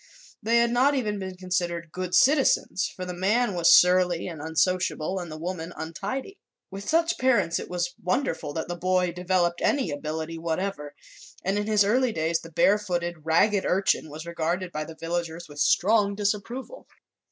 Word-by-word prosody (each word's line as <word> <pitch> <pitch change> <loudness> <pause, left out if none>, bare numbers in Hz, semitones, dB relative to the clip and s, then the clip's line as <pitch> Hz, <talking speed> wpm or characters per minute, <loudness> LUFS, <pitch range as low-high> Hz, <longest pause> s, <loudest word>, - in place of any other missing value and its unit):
They 230 +2 +2
had 235 0 +3
not 265 +4 +3
even 210 -6 -1
been 190 -1 -6
considered 175 -3 -2
"good 185 0 -3
citizens," 270 -9 +3
for 185 - -7
the 180 - -5
man 205 +5 +1
was 170 -2 +4
surly 180 -1 +5
and 165 -5 -7
unsociable 180 +2 0
and 175 -3 -7
the 155 - -6
woman 170 0 -5
untidy. 205 - -5 0.3
With 195 +1 -7
such 330 +1 +2
parents 230 -10 +2
it - - -7
was 175 0 -2
wonderful 180 - -1
that 160 - -3
the 175 - -4
boy 180 0 +1
developed 180 -1 0
any 265 - +1
ability 160 +3 -4
whatever, 165 -3 -3 0.5
and 195 +2 +1
in 210 - -3
his 210 -2 +4
early 250 +4 +2
days 160 -3 0
the 165 - -12
barefooted, 175 -4 0
ragged 195 +5 +3
urchin 190 -3 +1
was 155 +2 -8
regarded 170 +2 -2
by 155 -1 -4
the 160 0 -11
villagers 170 0 -4
with 145 0 -11
strong 200 +6 +3
disapproval. 215 - -3
180 Hz, 170 wpm, -26 LUFS, 165-205 Hz, 0.5 s, surly